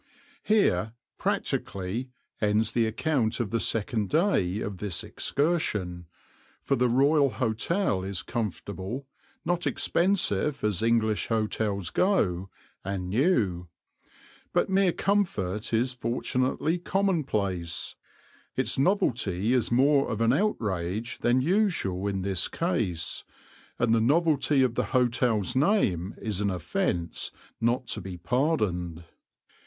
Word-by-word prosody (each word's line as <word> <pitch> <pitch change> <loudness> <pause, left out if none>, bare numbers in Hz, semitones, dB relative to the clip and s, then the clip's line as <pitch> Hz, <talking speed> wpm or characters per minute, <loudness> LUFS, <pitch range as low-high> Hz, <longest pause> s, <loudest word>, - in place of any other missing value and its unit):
Here, 200 - +2 0.3
practically, 100 +7 -2 0.3
ends 105 +1 +2
the 115 -2 +2
account 115 -1 0
of 110 -5 -2
the 115 - +1
second 110 -2 0
day 130 - +2
of 105 -3 -4
this 100 -6 -2
excursion, 105 - -1 0.6
for - - +1
the 125 0 +2
Royal 140 +3 +4
Hotel 125 - 0
is 95 -2 -4
comfortable, 105 +2 -4 0.4
not 175 0 0
expensive 150 - +1
as 105 -3 +1
English 115 -2 +1
hotels 105 -4 -1
go, 95 - +1 0.3
and 95 -2 -4
new; 105 - +1 0.9
but - - +1
mere 190 -1 +4
comfort 110 - -1
is 120 +3 +1
fortunately 125 +6 -1
commonplace, 130 - -1 0.6
its - - 0
novelty 120 - +1
is 125 -3 +2
rather - - +3
more 140 -1 +3
of 110 - -2
an 115 +1 +3
outrage 110 - -1
than 120 +2 +2
usual 160 - +1
in 95 -2 -2
this 95 -2 +1
case, 105 - -1 0.5
and 115 -1 +2
the 115 - +3
novelty 145 0 +3
of 125 -3 +1
the - - 0
hotel's 120 -5 +1
name 130 - +1
is 105 -3 -2
an 100 - +1
offence 85 -1 -2 0.3
not 120 +3 +1
to 125 - -1
be 95 -1 -7
pardoned. 90 - -1
115 Hz, 120 wpm, -27 LUFS, 95-140 Hz, 0.9 s, Royal